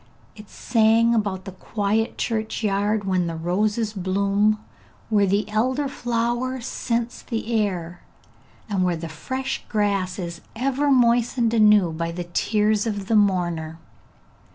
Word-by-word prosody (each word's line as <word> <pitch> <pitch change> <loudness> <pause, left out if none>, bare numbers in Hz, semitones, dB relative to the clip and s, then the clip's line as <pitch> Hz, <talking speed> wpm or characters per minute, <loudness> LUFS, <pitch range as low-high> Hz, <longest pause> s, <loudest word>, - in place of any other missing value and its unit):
It 210 -2 -13
sang 230 0 +3
about 200 -4 -1
the 195 - -6
quiet 210 +3 -1
churchyard, 215 -2 -1
when 185 -2 0
the 165 - -3
roses 210 +6 0
bloom, 200 +2 +1 0.5
where 205 -2 +4
the 200 +2 +1
elder 255 +7 0
flower 240 0 -1
scents 235 -1 -3
the 230 -1 -4
air, 180 -6 -1 0.7
and 200 -4 0
where 180 -2 +1
the 165 +1 -6
fresh 260 - -4
grass 200 -4 0
is 170 -2 -6
ever 275 +4 0
moistened 240 -2 +3
anew 210 -5 +5
by 165 +1 -3
the 175 +1 -4
tears 210 +5 +1
of 205 -3 -3
the 225 - +3
mourner. 175 -6 +1
210 Hz, 130 wpm, -23 LUFS, 185-230 Hz, 0.7 s, anew